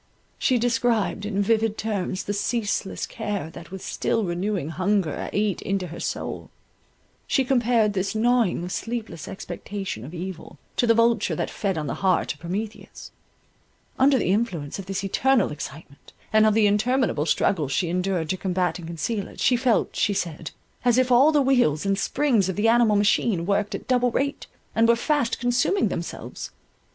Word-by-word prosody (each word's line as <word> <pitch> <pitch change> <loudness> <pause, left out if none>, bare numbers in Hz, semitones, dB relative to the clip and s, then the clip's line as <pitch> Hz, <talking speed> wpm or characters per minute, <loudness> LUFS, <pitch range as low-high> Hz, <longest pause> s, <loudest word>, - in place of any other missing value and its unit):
She 255 - +2
described 230 -3 0
in 200 -1 0
vivid 220 0 +1
terms 200 -3 -2
the 205 - -3
ceaseless 205 -1 -1
care 205 -8 -4
that 170 +1 -11
with 190 0 -8
still 225 - -1
renewing 180 -2 -2
hunger 185 -1 -1
ate 205 -2 0
into 195 -1 -1
her 165 - -8
soul; - - -4 0.8
she 270 - +2
compared 240 -4 +2
this 195 +2 -2
gnawing 230 -5 +2
of 180 - -5
sleepless 225 - -4
expectation 195 - -6
of 150 +8 -8
evil, 180 0 -7 0.2
to 240 - +2
the 230 - +5
vulture 230 -2 +2
that - - -3
fed 195 -4 -2
on 155 - -2
the 140 - -2
heart 185 -2 +2
of 145 - -21
Prometheus; 200 +7 -6 0.9
under 270 +1 +5
the 200 - +1
influence 190 -8 -1
of 190 - -7
this 195 0 -3
eternal 235 - +2
excitement, 145 -1 -9 0.2
and 215 0 +6
of 215 - +3
the 220 -1 +4
interminable 210 - +1
struggles 155 -8 +1
she 170 +6 +1
endured 180 -1 -1
to 185 - -1
combat 180 -2 -1
and 165 - -8
conceal 195 +5 -3
it, - - -14
she 250 - +3
felt, 240 -3 +1
she 205 - +1
said, 165 -4 -3 0.3
as 245 -1 +3
if 255 0 +2
all 265 +6 +6
the 295 -2 +3
wheels 245 - +2
and 195 0 +1
springs 230 -11 +1
of 190 - -2
the 210 +2 +2
animal 230 -2 +4
machine 205 -3 +2
worked 205 +1 0
at - - -8
double 250 -1 +3
rate, 275 +4 -2 0.3
and 225 0 +3
were 235 - +5
fast 245 0 0
consuming 245 +11 +2
themselves. - - -6
205 Hz, 175 wpm, -24 LUFS, 180-235 Hz, 0.9 s, and